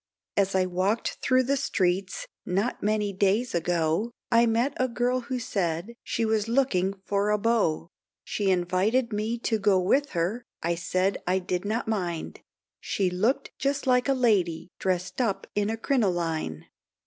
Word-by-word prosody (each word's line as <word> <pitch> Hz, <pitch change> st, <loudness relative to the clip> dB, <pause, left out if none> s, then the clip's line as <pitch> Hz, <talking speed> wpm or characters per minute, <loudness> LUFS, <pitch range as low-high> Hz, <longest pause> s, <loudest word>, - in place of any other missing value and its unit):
As 195 Hz, -1 st, +2 dB
I 185 Hz, -1 st, +3 dB
walked 185 Hz, +5 st, -1 dB
through 255 Hz, 0 st, +3 dB
the 275 Hz, +3 st, +1 dB
streets, 190 Hz, -8 st, 0 dB, 0.2 s
not 200 Hz, +7 st, -1 dB
many 210 Hz, -1 st, 0 dB
days 205 Hz, +5 st, +1 dB
ago, 170 Hz, +4 st, +1 dB, 0.2 s
I 235 Hz, 0 st, +5 dB
met 230 Hz, +5 st, +1 dB
a 255 Hz, -, +2 dB
girl 245 Hz, +1 st, 0 dB
who 255 Hz, +1 st, -4 dB
said, 190 Hz, -3 st, -2 dB
she 230 Hz, -, -1 dB
was 220 Hz, -1 st, +1 dB
looking 215 Hz, -7 st, +1 dB
for 200 Hz, +1 st, +1 dB
a 210 Hz, -, +3 dB
beau, 205 Hz, -8 st, +1 dB, 0.4 s
She 200 Hz, -2 st, -1 dB
invited 190 Hz, +7 st, +1 dB
me 215 Hz, +3 st, -1 dB
to 225 Hz, -2 st, 0 dB
go 195 Hz, -2 st, +4 dB
with 275 Hz, +10 st, +1 dB
her, 195 Hz, +9 st, 0 dB, 0.2 s
I 170 Hz, +1 st, +1 dB
said 185 Hz, +3 st, 0 dB
I 185 Hz, +1 st, +3 dB
did 180 Hz, 0 st, -2 dB
not 220 Hz, +3 st, -1 dB
mind; 180 Hz, -7 st, -3 dB, 0.4 s
She 190 Hz, -3 st, -1 dB
looked 230 Hz, +10 st, 0 dB
just 275 Hz, +1 st, 0 dB
like 250 Hz, +1 st, +3 dB
a 270 Hz, -, +4 dB
lady, 195 Hz, -10 st, +1 dB
dressed 185 Hz, +3 st, -1 dB
up 215 Hz, -6 st, -1 dB
in 205 Hz, 0 st, 0 dB
a 225 Hz, -, -2 dB
crinoline. 170 Hz, -, -1 dB
205 Hz, 160 wpm, -27 LUFS, 180-235 Hz, 0.4 s, I